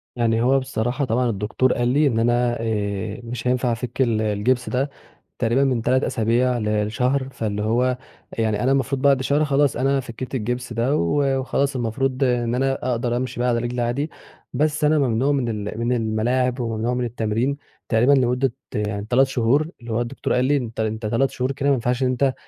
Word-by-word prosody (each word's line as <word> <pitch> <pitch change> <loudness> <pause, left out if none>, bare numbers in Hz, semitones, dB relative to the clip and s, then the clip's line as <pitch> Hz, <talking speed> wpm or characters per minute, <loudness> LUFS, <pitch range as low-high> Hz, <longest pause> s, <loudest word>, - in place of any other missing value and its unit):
يعني 115 -1 +1
هو 135 +3 +4
بصراحة 130 +1 -2
طبعًا 125 +1 +1
الدكتور 110 +5 0
قال 120 0 0
لي 145 +4 +3
إن 115 -4 +1
أنا 120 +1 +2
آآ، 105 -1 -2
مش 120 0 -5
هينفَع 125 -1 +1
أفِك 120 +3 -3
ال 115 -4 +2
الجبس 110 +4 0
ده 135 +3 0 0.5
تقريبًا 120 +3 +2
من 130 -4 +1
3 130 +3 +2
أسابيع 120 +2 +1
ل 105 -2 0
لشهر، 130 +4 0
فاللي 105 -4 -3
هو 115 +3 +2 0.5
أ - - +1
يعني 110 0 0
أنا 130 - +2
المفروض 135 0 0
بعد 135 -1 +4
شهر 145 +3 +2
خلاص 140 -1 +2
أنا 135 +1 +2
فكّيت 130 +1 -6
الجبس 125 +1 -3
ده 120 +6 +1
و 135 +10 +1
وخلاص 135 +1 -1
المفروض 130 +3 -1
إن 120 -2 +1
أنا 135 +1 +1 0.2
أقدر 120 0 -1
أمشي 125 -1 -4
بقى 125 0 +1
على 120 -1 +1
رجلي 120 +1 -2
عادي 135 +6 -1 0.4
بس 150 +3 0
أنا 150 0 +4
ممنوع 130 +1 +1
من 130 -4 0 0.2
ال 110 - -5
من 120 +1 +1
الملاعب 120 +3 0
وممنوع 115 +1 -1
من 125 0 -1
التمرين 115 +4 -1 0.3
تقريبًا 120 +4 +4
لمدة 125 -1 +2 0.2
يعني 105 -1 -2
3 130 +2 +4
شهور 135 +4 +1
اللي 115 - -7
هو 115 +2 0
الدكتور 120 +3 -2
قال 125 +1 +2
لي 145 +2 +3
أنت 120 -4 -5
أنت 110 0 -2
3 115 +5 +1
شهور 130 +1 -2
كده 140 +1 -1
ما 140 - +4
ينفعش 125 +1 -1
إن - - +3
أنت 130 +1 +1
125 Hz, 200 wpm, -22 LUFS, 115-135 Hz, 0.5 s, هو